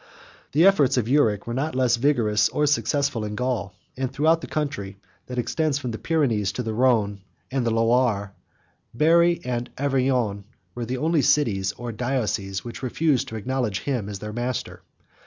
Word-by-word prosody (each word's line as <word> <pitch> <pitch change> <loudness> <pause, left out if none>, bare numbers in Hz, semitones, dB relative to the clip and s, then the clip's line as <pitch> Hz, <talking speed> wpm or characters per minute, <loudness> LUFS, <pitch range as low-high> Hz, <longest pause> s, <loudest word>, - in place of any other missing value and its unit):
92 - - +3
The 170 - +7
efforts 145 -9 +4
of 120 - +2
Euric 115 -6 +2
were 120 - -4
not 135 +3 -2
less 125 -2 +3
vigorous, 115 -6 +2
or 150 - -3
less 150 -1 +3
successful, 140 -1 0
in 105 0 -4
Gaul; 115 -5 -2 0.2
and 130 0 -2
throughout 160 +4 +2
the - - -7
country 120 -11 -3 0.3
that 125 - -6
extends 150 +4 0
from 125 -4 -4
the 110 - -6
Pyrenees 115 - +1
to 125 - -3
the 110 -1 -3
Rhone 110 -5 +2 0.3
and 130 -1 0
the 115 - +1
Loire, 115 -3 +1 0.6
Berry 170 +5 +4
and 120 -1 -2
Auvergne 130 -7 0 0.3
were 120 -1 -4
the 125 +3 -3
only 160 +2 +2
cities, 100 -11 +2
or 120 -1 -6
dioceses, 110 -5 -2
which 120 - -7
refused 135 +1 +1
to 110 - -7
acknowledge 110 -3 -2
him 125 -8 -2
as 100 - -5
their 105 +2 -7
master. 120 +2 -4
125 Hz, 180 wpm, -24 LUFS, 110-140 Hz, 0.6 s, The